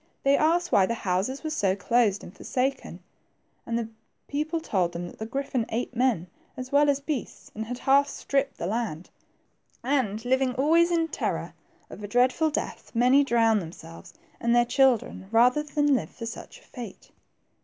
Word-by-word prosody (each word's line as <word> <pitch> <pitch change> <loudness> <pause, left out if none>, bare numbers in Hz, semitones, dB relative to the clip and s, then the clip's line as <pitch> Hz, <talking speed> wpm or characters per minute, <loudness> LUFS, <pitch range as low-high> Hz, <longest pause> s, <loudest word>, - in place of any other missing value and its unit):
They 275 +1 +4
asked 340 +4 +2
why 190 -2 +4
the 235 - -1
houses 200 - -2
were 310 - -3
so 195 -11 +1
closed 205 0 +1
^d 180 - -10
forsaken; 260 +6 -3 0.6
and 230 0 -1
the 230 -1 -3 0.4
people 305 +3 -2
told 185 - -1
them 175 +1 -4
that 175 - -11
the 220 - -4
griffin 260 -2 -2
ate 240 +2 -3
men, 235 -8 +1 0.3
as 255 0 -6
well 290 +1 +4
as 280 -1 +2
beasts, 280 -3 -5
and 220 +1 -5
had 245 +1 -4
half 280 +2 +3
stripped 275 -1 -2
the - - -4
land. 195 -5 -3 0.7
And 240 -5 0
living 260 0 +1
always 325 +6 +4
in 330 -1 +1
terror 175 - -3 0.3
of 210 - -11
a - - -4
dreadful 255 +8 +2
death, 300 - -4
many 250 +4 +5
drowned 225 -5 +3
them 165 -2 -7
selves 85 - -13 0.2
and 235 0 +2
their 240 0 +5
children, 250 -6 +2
rather 245 +5 +4
than 295 -1 +1
live 260 - 0
for 230 - -8
such 230 - -9
a - - -22
fate. 240 - -10
245 Hz, 180 wpm, -26 LUFS, 215-280 Hz, 0.7 s, many